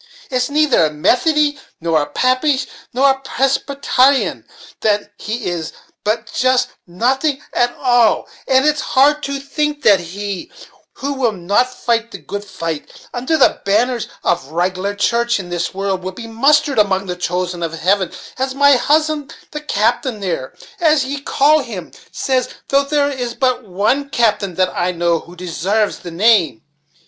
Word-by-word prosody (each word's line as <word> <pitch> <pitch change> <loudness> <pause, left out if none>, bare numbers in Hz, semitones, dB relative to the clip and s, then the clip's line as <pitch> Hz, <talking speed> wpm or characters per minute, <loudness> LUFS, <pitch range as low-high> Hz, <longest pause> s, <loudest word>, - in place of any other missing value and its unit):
It's 250 0 0
neither 290 - +3
a - - +1
Methodie, 290 - +2 0.2
nor 165 -2 +1
a 145 - -3
Papish, 255 - +1 0.3
nor 270 +1 +2
Parsbetyrian, 270 0 +1 0.3
that 205 -1 0
he 220 +1 -4
is, 170 -3 -3 0.3
but 215 +2 0
just 255 0 +2 0.2
nothing 265 - 0
at 240 0 +2
all; 245 -3 +3 0.2
and 265 +1 +4
it's 300 0 +2
hard 290 +3 +3
to 280 -1 -3
think 295 +1 -2
that 200 -3 +6
he, 195 +3 -6 0.4
'who 280 +1 -3
will 260 -4 +1
not 200 +7 +1
fight 230 -2 -1
the - - -8
good 205 0 -6
fight, 165 -6 -5 0.2
under 255 +6 0
the 275 - +3
banners 230 +4 +1 0.2
of 135 -6 0
a - - -16
rig'lar 185 +4 -1
church, 235 +2 +1
in 180 -2 -7
this 175 -1 -2
world, 195 -1 -2
will 185 +1 -4
be 230 +4 -8
mustered 275 +4 +2
among 195 -2 +2
the 180 -1 -4
chosen 180 0 -2
in 165 - -1
heaven,' 185 +3 +1 0.3
as 265 0 -1
my 285 -1 +5
husband, 305 +2 0 0.2
the 300 - -5
captain 245 -2 0
there, 170 -9 -4 0.2
as 310 -5 +3
ye 280 +1 -4
call 295 +2 +3
him, 215 - -7 0.2
says 255 -2 0 0.2
though 275 0 +4
there 285 0 +1
is 245 -3 -4
but 255 -2 0
one 215 +9 0
captain 210 -7 +1
that 185 0 0
I 180 +1 0
know, 170 -1 +1
who 175 +2 -14
desarves 185 +4 -1
the 175 - -8
name. 180 - +2
235 Hz, 160 wpm, -18 LUFS, 185-275 Hz, 0.4 s, that